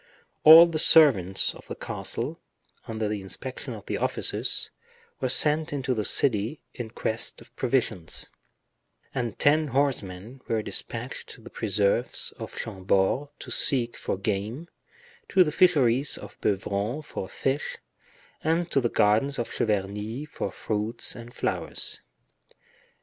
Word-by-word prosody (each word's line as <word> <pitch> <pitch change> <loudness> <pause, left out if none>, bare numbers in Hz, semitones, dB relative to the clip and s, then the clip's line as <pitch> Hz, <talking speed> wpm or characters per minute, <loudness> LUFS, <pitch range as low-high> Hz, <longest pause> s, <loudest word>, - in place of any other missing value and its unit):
All 160 +2 +11
the 165 -2 -2
servants 115 - +5
of - - -15
the - - -6
castle, - - -4 0.5
under 110 -1 -2
the 105 -1 -3
inspection 125 +6 -6
of 105 - -11
the - - -3
officers, - - 0 0.5
were 130 - -1
sent 150 +4 +3
into 135 -3 -1
the 110 -3 -2
city 115 +4 +3
in 120 -3 -6
quest 110 0 -2
of 120 - -18
provisions, 115 -10 -1 0.8
and 120 -4 -3
ten 155 +2 +3
horsemen 125 -4 -2
were 110 -1 -1
dispatched - - -3
to - - -17
the - - -12
preserves 105 +4 +1
of - - -8
Chambord 95 +6 0
to - - -9
seek 120 -4 +2
for - - -3
game, 110 - -3 0.6
to 185 - +5
the 150 - -2
fisheries 145 -7 +3
of - - -12
Beuvron 105 +7 -1
for 95 -9 -6
fish, 135 +2 -2 0.7
and 165 +2 0
to 135 - +2
the 120 - 0
gardens 110 +8 +2
of 120 - -3
Cheverny 105 +5 -2
for 145 - -5
fruits 110 +4 -2
and 120 0 -10
flowers. - - -2
120 Hz, 135 wpm, -26 LUFS, 105-140 Hz, 0.8 s, All